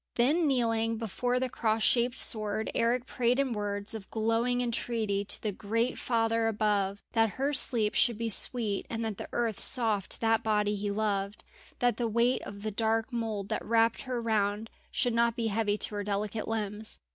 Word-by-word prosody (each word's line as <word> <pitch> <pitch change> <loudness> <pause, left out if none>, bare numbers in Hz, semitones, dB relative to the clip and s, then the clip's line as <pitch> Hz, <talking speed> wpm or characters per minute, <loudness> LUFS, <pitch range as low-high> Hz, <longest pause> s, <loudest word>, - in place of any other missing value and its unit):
Then 300 +7 +2
kneeling 230 -4 0
before 245 +3 -2
the 260 - -1
cross 220 -2 -1
shaped 240 +4 +2
sword, 215 -1 +3
Eric 240 +2 0
prayed 250 0 0
in 270 -3 0
words 205 -1 -3
of 215 -3 -8
glowing 230 +2 0
entreaty 225 -4 -1
to - - -1
the 215 - -3
great 225 +5 -1
Father 225 -1 0
above, 205 -2 -1
that 225 -2 +1
her 275 +2 0
sleep 225 -6 +6
should 235 -4 +2
be 230 0 -3
sweet 220 -1 +3
and 230 0 -3
the 215 -3 -5
earth 230 -4 -2
soft 220 -6 0
to - - -6
that 225 -1 +2
body 210 -1 0
he 205 0 -3
loved, 200 -1 -2 0.3
that 245 -3 +1
the 240 - -1
weight 235 +3 +1
of 200 0 -9
the 215 - -3
dark 225 +3 -1
mould 220 -4 -3
that - - -2
wrapped 230 0 +2
her 255 -2 -4
round 215 -1 -1 0.2
should 245 -3 0
not 235 0 +2
be 230 -2 -1
heavy 210 -1 0
to 215 - -1
her 205 0 -3
delicate 205 +1 -3
limbs. 215 -1 -2
225 Hz, 185 wpm, -29 LUFS, 210-235 Hz, 0.3 s, sleep